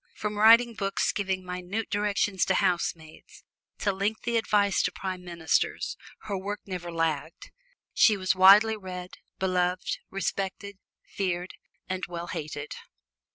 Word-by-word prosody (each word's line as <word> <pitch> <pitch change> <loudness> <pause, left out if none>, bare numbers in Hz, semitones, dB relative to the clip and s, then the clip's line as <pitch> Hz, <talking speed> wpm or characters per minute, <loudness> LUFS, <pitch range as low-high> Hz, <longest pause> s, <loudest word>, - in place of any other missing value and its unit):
From 210 0 -4
writing 230 +2 +7
books 195 -2 0
giving 190 -2 -2
minute 180 +4 -4
directions 205 -2 +1
to 190 - +1
housemaids, 165 -3 -2 0.3
to 205 - 0
lengthy 215 +4 -2
advice 205 -3 +2
to - - 0
prime 185 -2 -5
ministers, 170 -2 -1 0.3
her 205 - -4
work 200 +2 -4
never 180 -3 -5
lagged. 165 -2 -2 0.4
She 215 -3 +5
was 185 -1 +1
widely 200 +4 +7
read, 185 -3 -8 0.2
beloved, 180 -1 0
respected, 195 +1 -4 0.2
feared 180 -2 -3 0.4
and 185 0 -4
well 170 -1 -5
hated. 150 -1 -5
190 Hz, 125 wpm, -27 LUFS, 180-205 Hz, 0.4 s, writing